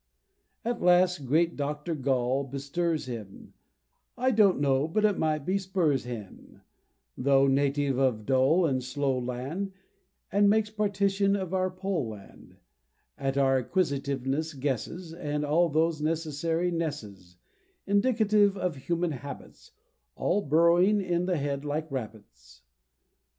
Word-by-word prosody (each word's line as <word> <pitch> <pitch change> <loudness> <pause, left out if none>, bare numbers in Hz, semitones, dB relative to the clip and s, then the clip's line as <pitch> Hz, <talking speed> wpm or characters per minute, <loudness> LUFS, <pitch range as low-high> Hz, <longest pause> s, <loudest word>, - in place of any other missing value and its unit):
At 240 +1 -2
last 180 -4 +3
great 165 +5 +2
Dr. 150 +3 -3
Gall 135 -2 0
bestirs 140 +4 -2
him 110 -6 -9 0.6
I 255 +2 +2
don't 210 - +4
know 140 0 +2
but 215 +6 +1
it 205 -2 +1
might 155 -2 0
be 190 +2 +1
Spurzheim 140 - -3 0.5
Tho' 135 +1 +3
native 140 0 +1
of 130 -5 +1
a - - -15
dull 135 - +3
and 130 -4 0
slow 130 +1 -1
land, 135 +11 -4 0.6
And 200 0 +4
makes 215 0 +2
partition 200 -1 +1
of 190 -2 -4
our 185 0 +1
Poll 185 -6 -3
land; 105 -2 -13 0.6
At 135 0 -2
our 135 -1 +3
Acquisitiveness 140 -1 -1
guesses, 145 - -3
And 150 -3 -3
all 165 +4 +3
those 160 0 +1
necessary 165 +2 -1
nesses 105 - -5 0.5
Indicative 205 -1 +3
of 180 -4 -2
human 170 +5 -1
habits, 140 0 -9 0.5
All 205 +3 0
burrowing 170 +6 +4
in 180 -2 -1
the 180 -2 +1
head 140 -1 -2
like 150 +1 -3
rabbits. 65 - -8
155 Hz, 130 wpm, -28 LUFS, 135-180 Hz, 0.6 s, don't